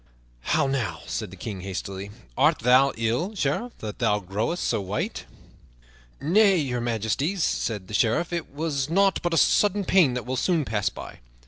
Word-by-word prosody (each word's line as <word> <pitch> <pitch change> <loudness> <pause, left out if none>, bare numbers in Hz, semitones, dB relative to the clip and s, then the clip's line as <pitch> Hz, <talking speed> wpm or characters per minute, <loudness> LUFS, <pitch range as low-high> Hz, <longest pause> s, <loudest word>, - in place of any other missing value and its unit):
"How - - +3
now," 120 -11 -2
said 110 -3 -4
the 95 - -12
King 95 0 -6
hastily, 95 +1 -5 0.3
"art - - +4
thou 130 +4 +5
ill, 120 - -1
Sheriff, 195 - -2
that 105 -1 -6
thou 110 -4 +2
growest 105 - -2
so - - 0
white?" 100 +2 -3 0.9
"Nay, 195 +6 +4
Your 125 -6 -1
Majesty," 120 - -1
said 110 - -1
the 105 - -10
Sheriff, 120 - +1
"it 170 -2 -3
was 145 -2 -2
nought 195 +3 +3
but 175 - -1
a - - +1
sudden 205 +5 +3
pain 165 -11 +4
that 125 - -4
will 130 +1 -2
soon 165 +1 +1
pass 105 -3 0
by." - - -10
130 Hz, 175 wpm, -25 LUFS, 105-170 Hz, 0.9 s, thou